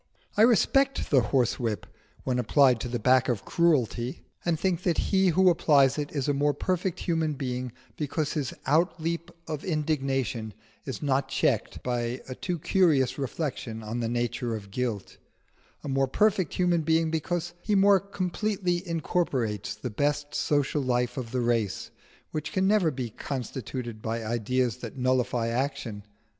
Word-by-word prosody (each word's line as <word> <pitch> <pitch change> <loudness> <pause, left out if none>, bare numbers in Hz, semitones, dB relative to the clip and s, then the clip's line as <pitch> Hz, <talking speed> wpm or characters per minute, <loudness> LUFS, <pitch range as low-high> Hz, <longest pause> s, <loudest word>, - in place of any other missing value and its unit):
I - - +3
respect 270 +4 +3
the 135 -3 +6
horsewhip 120 -2 0 0.4
when 125 -1 0
applied 125 0 +4
to 125 - -3
the 120 0 -2
back 130 +3 +3
of 120 -5 -1
Cruelty, 130 -7 +1 0.2
and 170 -2 0
think 185 -3 0
that 175 -3 +1
he 190 -1 +2
who 185 +1 +5
applies 140 -4 +4
it 145 -1 -3
is 140 -2 -2
a 145 - +2
more 145 +1 +1
perfect 185 -1 -1
human 160 -3 0
being 125 -3 -3 0.3
because 150 0 -1
his 145 -5 -2
outleap 165 +2 0 0.2
of 155 -2 -4
indignation 135 - -1 0.3
is - - -5
not 135 -1 +1
checked 135 -4 0
by 120 0 -1
a 130 - -5
too 175 +6 -3
curious 155 -6 +2
reflection 130 -5 -4
on 110 +3 -4
the 115 -1 -1
nature 120 0 -1
of 100 -2 -8
guilt 115 -4 -3 0.7
a - - -6
more 135 0 +1
perfect 190 +3 +2
human 175 -2 +2
being 160 +1 +2
because 175 +2 -2
he 210 +3 0
more 195 0 +6
completely 185 -1 -1
incorporates 130 - -1
the 110 +3 -5
best 145 +5 -1
social 145 0 +1
life 125 -1 0
of 125 -4 -4
the 125 +1 -1
race, 115 -4 0 0.4
which 155 -1 -4
can 190 0 +1
never 200 -5 +4
be 125 -5 -4
constituted 125 -2 -5
by 115 0 -3
ideas 120 +1 0
that - - -8
nullify 125 -2 +1
action. 120 -4 -2
135 Hz, 155 wpm, -27 LUFS, 120-165 Hz, 0.7 s, the